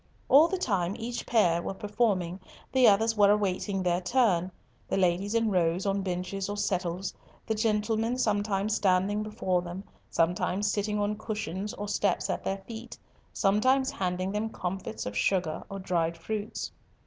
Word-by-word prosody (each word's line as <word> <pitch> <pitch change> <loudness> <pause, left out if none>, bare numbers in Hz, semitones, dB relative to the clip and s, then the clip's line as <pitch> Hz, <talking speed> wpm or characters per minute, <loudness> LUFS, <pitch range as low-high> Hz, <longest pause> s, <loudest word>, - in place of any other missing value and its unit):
All 295 +5 +8
the 380 - -1
time 195 - 0
each 235 +1 -5
pair 175 -8 +3
were 195 - -4
performing, 200 -4 0 0.3
the 260 -2 +5
others 225 +2 +4
were 205 -2 +5
awaiting 200 -1 +1
their 175 0 +1
turn, 185 -4 +2 0.4
the - - -1
ladies 190 +3 +1
in 225 -2 +2
rows 180 0 +1
on 195 0 +1
benches 190 +1 -3
or 205 - -3
settles, 185 -1 -1 0.3
the 220 - 0
gentlemen 220 +2 0
sometimes 205 -3 +1
standing 195 +2 +2
before 190 -4 -1
them, 175 +2 -7 0.3
sometimes 180 +4 +1
sitting 210 +1 -1
on 205 +1 -1
cushions 210 -2 -4
or 205 - -5
steps 200 -2 0
at - - -3
their 195 0 -3
feet, 230 +1 -8 0.3
sometimes 255 +7 +2
handing 185 0 -2
them 210 +2 -1
comfits 180 - -4
of 100 - -5
sugar 175 - 0
or 195 - -5
dried 170 -3 -1
fruits. 210 +5 -4
200 Hz, 160 wpm, -28 LUFS, 180-215 Hz, 0.4 s, All